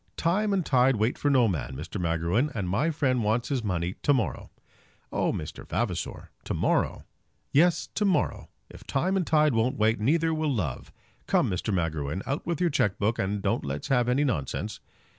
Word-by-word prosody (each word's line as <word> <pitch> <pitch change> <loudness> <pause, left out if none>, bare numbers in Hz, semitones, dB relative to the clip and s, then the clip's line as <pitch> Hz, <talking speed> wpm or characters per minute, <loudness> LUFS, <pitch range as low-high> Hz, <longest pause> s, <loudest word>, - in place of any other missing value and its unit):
"Time 200 +5 +1
and 190 -4 +1
tide 130 0 +4
wait 110 +3 +1
for 145 - 0
no 130 -4 +4
man, 80 -8 -3
Mr. 85 +7 -5
Magruin, 85 - +1
and 100 -5 -2
my 105 - +1
friend 130 -6 +1
wants 110 +3 0
his 135 -4 -1
money 90 -3 -1
to 145 - +3
morrow." 110 - -2 0.6
"Oh, - - +1
Mr. - - -6
Vavasor, - - -3
to - - -3
morrow!" - - 0 0.5
"Yes, 170 +3 +3
to 210 - 0
morrow. 195 -3 0 0.2
If - - -13
time 180 +8 0
and 185 -4 0
tide 150 -2 +4
won't 115 +3 +1
wait, 110 +2 +2
neither 160 +8 +2
will 155 -1 0
love. 85 - -3 0.4
Come, - - +2
Mr. 90 +4 -2
Magruin, 80 -2 -1
out 140 +4 -3
with 170 -3 -1
your 175 -2 +2
cheque 105 -8 +1
book, 110 +3 0
and 100 +1 -1
don't - - 0
let's 70 +1 -4
have 125 -3 +2
any 130 +4 +2
nonsense." 105 - -2
120 Hz, 190 wpm, -27 LUFS, 95-150 Hz, 0.6 s, tide